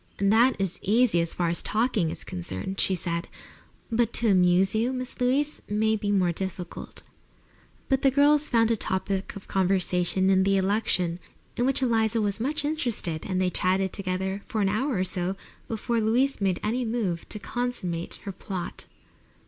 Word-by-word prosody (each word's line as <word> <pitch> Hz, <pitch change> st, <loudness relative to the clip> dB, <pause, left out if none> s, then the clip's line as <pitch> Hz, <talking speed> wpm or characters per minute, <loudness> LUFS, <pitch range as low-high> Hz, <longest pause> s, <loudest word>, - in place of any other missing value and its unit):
"That 220 Hz, +6 st, +4 dB
is 195 Hz, -2 st, 0 dB
easy, 215 Hz, -3 st, +3 dB
as 170 Hz, -, -3 dB
far 175 Hz, -2 st, 0 dB
as 170 Hz, -, +3 dB
talking 215 Hz, -6 st, +1 dB
is -, -, -2 dB
concerned," 95 Hz, -, -4 dB
she 190 Hz, -, +2 dB
said. 170 Hz, -1 st, -3 dB, 0.6 s
"But 235 Hz, 0 st, +1 dB
to 230 Hz, -1 st, +2 dB
amuse 185 Hz, +1 st, +4 dB
you, 225 Hz, +3 st, +1 dB
Miss 255 Hz, -1 st, -5 dB
Louise, 280 Hz, +4 st, +1 dB
may 220 Hz, +1 st, +2 dB
be 205 Hz, -1 st, -3 dB
more 185 Hz, -4 st, +2 dB
difficult." 180 Hz, 0 st, -6 dB, 0.8 s
But 270 Hz, -1 st, +1 dB
the 270 Hz, -, +5 dB
girls 290 Hz, +2 st, +4 dB
found 230 Hz, -1 st, +3 dB
a -, -, +3 dB
topic 190 Hz, -1 st, -2 dB
of 200 Hz, -, -10 dB
conversation 185 Hz, 0 st, +1 dB
in 190 Hz, 0 st, +4 dB
the 195 Hz, +1 st, +3 dB
election, 190 Hz, -3 st, +1 dB, 0.4 s
in 245 Hz, -, +1 dB
which 270 Hz, 0 st, +1 dB
Eliza 225 Hz, -2 st, +2 dB
was 205 Hz, -1 st, 0 dB
much 290 Hz, +5 st, 0 dB
interested, 240 Hz, -, -2 dB
and 185 Hz, -2 st, -1 dB
they 185 Hz, -1 st, +1 dB
chatted 190 Hz, +1 st, +1 dB
together 190 Hz, 0 st, -2 dB
for 225 Hz, -4 st, -2 dB
an 195 Hz, -, +2 dB
hour 255 Hz, +6 st, 0 dB
or 185 Hz, -, +1 dB
so 185 Hz, 0 st, -1 dB, 0.3 s
before 230 Hz, +1 st, -1 dB
Louise 240 Hz, +4 st, +1 dB
made 190 Hz, -3 st, +1 dB
any 235 Hz, +4 st, 0 dB
move 220 Hz, -8 st, -2 dB
to -, -, -2 dB
consummate 200 Hz, -7 st, -4 dB
her 200 Hz, -, -4 dB
plot. 185 Hz, -1 st, -5 dB
200 Hz, 175 wpm, -26 LUFS, 185-235 Hz, 0.8 s, the